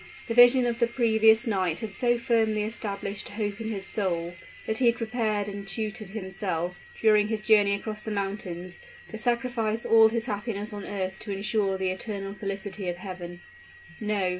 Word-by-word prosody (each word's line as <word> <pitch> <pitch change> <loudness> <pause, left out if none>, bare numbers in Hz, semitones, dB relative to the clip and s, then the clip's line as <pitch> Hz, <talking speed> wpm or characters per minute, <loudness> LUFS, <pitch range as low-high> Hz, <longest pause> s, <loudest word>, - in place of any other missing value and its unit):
The 230 - -1
vision 245 +1 +7
of 235 -1 -1
the 235 - +4
previous 225 -1 +4
night 185 -7 0
had 220 -3 -5
so 240 +2 +2
firmly 220 -3 +1
established 205 -2 -4
hope 205 0 -3
in 220 - -3
his 195 -3 -4
soul, 175 -5 -2 0.3
that 220 - -1
he 255 - +4
had 235 - +4
prepared 220 -3 -1
and 200 -1 -6
tutored 215 0 -3
himself, 190 -4 -3 0.2
during 210 -2 +4
his 215 -1 -2
journey 210 -2 +5
across 215 +1 -5
the 220 - -6
mountains, 195 -4 -4 0.3
to 220 - -6
sacrifice 235 -1 0
all 225 -1 +7
his 230 0 -1
happiness 210 -1 -3
on 205 -1 -6
earth 190 -2 -4
to 210 - -6
insure 195 0 0
the 190 -1 0
eternal 195 0 -4
felicity 195 -1 -4
of 175 - -2
heaven. 175 -2 -8 0.6
No. 210 -4 0
210 Hz, 175 wpm, -27 LUFS, 195-225 Hz, 0.6 s, vision